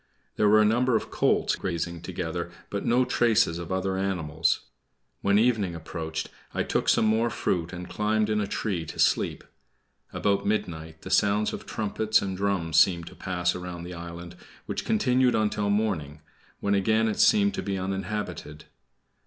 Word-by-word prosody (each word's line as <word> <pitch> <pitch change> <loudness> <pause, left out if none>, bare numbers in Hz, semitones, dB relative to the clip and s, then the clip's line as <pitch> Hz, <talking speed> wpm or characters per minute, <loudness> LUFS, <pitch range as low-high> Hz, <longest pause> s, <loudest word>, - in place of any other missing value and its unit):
There 105 - +3
were 110 +1 +6
a - - +3
number 120 +3 +2
of - - -1
colts - - +2
grazing 85 -2 -3
together, 85 -1 -4 0.2
but 100 - -2
no 125 +2 +3
traces 115 -9 +2
of 85 0 -7
other 95 0 -1
animals. 85 -4 0 0.6
When 100 0 +3
evening 110 -6 +2
approached 80 0 -5 0.3
I - - +1
took - - 0
some - - +4
more 110 +2 +2
fruit 90 -5 -1
and 90 -1 -7
climbed 105 0 0
in 105 -1 +1
a 100 - -2
tree 100 -4 -2
to - - -8
sleep. - - +1 0.7
About 100 -1 0
midnight 80 -6 -3
the 95 - -7
sound 105 +2 +2
of - - -7
trumpets 110 +1 +1
and 95 -1 -3
drums 90 -5 0
seemed 85 -2 +3
to - - -15
pass 90 -1 -1
around 90 -1 -6
the 90 +1 -7
island, 85 0 -8 0.3
which - - -4
continued 130 - +3
until 105 -1 0
morning, 80 -9 -1 0.4
when 100 - +1
again 110 +3 +2
it 110 - -2
seemed 205 -1 +5
to - - -3
be 100 -1 -2
uninhabited. 95 -4 -4
95 Hz, 170 wpm, -27 LUFS, 85-110 Hz, 0.7 s, were